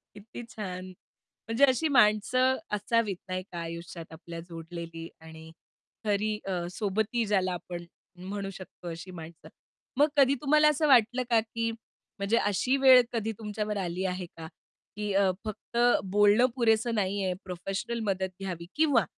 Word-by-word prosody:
किती 220 +3 -9
छान. 185 -3 -6 0.6
म्हणजे 230 +5 +4
अशी 270 +4 +3
माणसं 255 +2 +4 0.2
असावीत, 210 -1 +1
नाही 185 0 -2
का. 170 - -5
आयुष्यात 170 0 -7
आपल्या 165 +1 -8
जोडलेली 165 0 -7
आणि 160 0 -12 0.5
खरी 210 +1 0
अ, 180 -3 -2
सोबती 220 +4 -1
ज्याला 190 -3 +1
आपण 175 0 -6 0.3
म्हणू 195 +2 -5
शकतो, 185 -1 -10
अशी 165 +2 -7
माणसं. 165 -2 -10 0.5
मग 295 +2 +5
कधी 275 -1 +5
तुम्हाला 300 +1 +5
असं 300 +1 +2
वाटलं 245 -1 +5
का, 230 -1 +5
की 230 +1 -3 0.5
म्हणजे 200 +3 +1
अशी 230 +6 +1
वेळ 260 -2 +8
कधी 225 -1 -1
तुमच्यावर 210 -1 -3
आली 185 0 -2
आहे 180 -1 -2
का? 160 -1 -7 0.5
की 210 -1 -2
अ, 195 -1 +4
फक्त 215 +2 -7 0.3
बोलणं 205 +4 +5
पुरेसं 230 -1 +2
नाही 200 -1 0
आहे 185 -1 0
प्रोफेशनल 195 +6 -4
मदत 190 -2 0
घ्यावी 175 -3 -5
किंवा 310 -2 +4
205 Hz, 145 wpm, -29 LUFS, 180-230 Hz, 0.6 s, वेळ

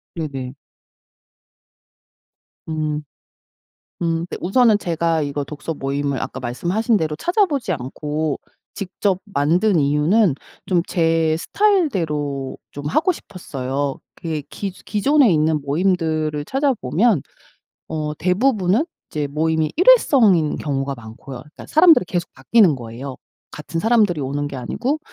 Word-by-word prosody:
네네. 135 -5 -5 2.1
음. 155 -1 -2 1.0
음 165 0 0
네 - - -5
우선은 220 +3 +4
제가 165 -2 0
이거 145 0 -2
독서 150 +2 -5
모임을 140 0 -2
아까 - - -5
말씀하신 200 - 0
대로 155 -3 -2
찾아보지 320 - +1
않고 150 +2 -3 0.4
직접 195 -1 -1
만든 175 +2 +2
이유는 150 +5 +3 0.3
좀 180 -3 +2
제 165 -2 +2
스타일 400 - +2
대로 145 - -3
좀 145 0 -8
하고 315 - +2
싶었어요. 140 - -4 0.2
이게 160 -3 -2
기조 195 -2 -6
기존에 255 +2 +3
있는 155 -1 +2
모임들을 155 -1 0
찾아 270 0 +1
보면 185 - +1 0.7
어 150 -1 -3
대부분은 200 - +2 0.2
이제 150 -2 -2
모임이 155 +1 0
일회성인 255 - +5
경우가 140 -2 -2
많고요. 120 +3 -10
그러니까 150 +4 -13
사람들이 315 - +6
계속 175 -1 -3
바뀌는 200 -11 +4
거예요 125 +3 -7 0.3
같은 165 +2 -5
사람들이 210 -9 +3
오는 145 +2 -2
게 140 - -7
아니고. 250 - -2
160 Hz, 280 characters per minute, -21 LUFS, 145-205 Hz, 2.1 s, 사람들이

